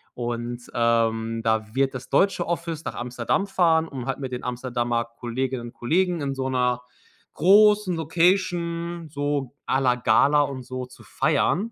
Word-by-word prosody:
und, 120 0 -4
ähm, 115 -1 +1
da 110 0 0
wird 135 0 +2
das 130 -1 -8
deutsche 195 -3 +2
Office 170 -2 -3
nach - - -5
Amsterdam 125 +9 -1
fahren, 165 -4 +2
um 130 -4 -7
halt 135 - -2
mit 130 -2 -5
den 125 - -5
Amsterdamer 120 -1 -2
Kolleginnen 120 +1 -4
und - - -11
Kollegen 175 +7 0
in 140 -1 -2
so 130 0 -2
'ner 125 -1 +1 0.5
großen 205 -1 +5
Location 170 0 0
so 145 -3 -2
à 130 - +2
la 125 -2 +3
Gala 140 +5 +4
und 135 -3 -3
so 130 0 -5
zu 125 - -16
feiern. 215 +6 0
130 Hz, 160 wpm, -24 LUFS, 120-170 Hz, 0.5 s, großen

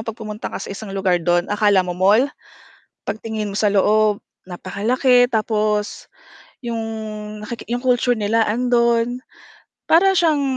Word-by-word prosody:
'pag 225 0 -6
pumunta 215 -1 -6
ka - - -7
sa 195 - -6
isang 200 +1 -8
lugar 185 -3 +1
do'n 175 +3 0
akala 205 -3 +3
mo 180 - -3
mall, 200 +8 +3 0.8
pagtingin 220 -1 -4
mo 200 - -6
sa 210 -2 +2
loob, 210 +1 +2 0.2
napakalaki 235 +8 +1
tapos 215 -3 -1 0.6
'yong 230 -1 -3 0.6
naki 230 +2 -8
culture 245 0 +1
nila 220 +1 +1
ando'n. 235 +1 +1 0.7
Para 370 +4 +5
siyang 310 -4 +2
215 Hz, 130 wpm, -20 LUFS, 205-240 Hz, 0.8 s, Para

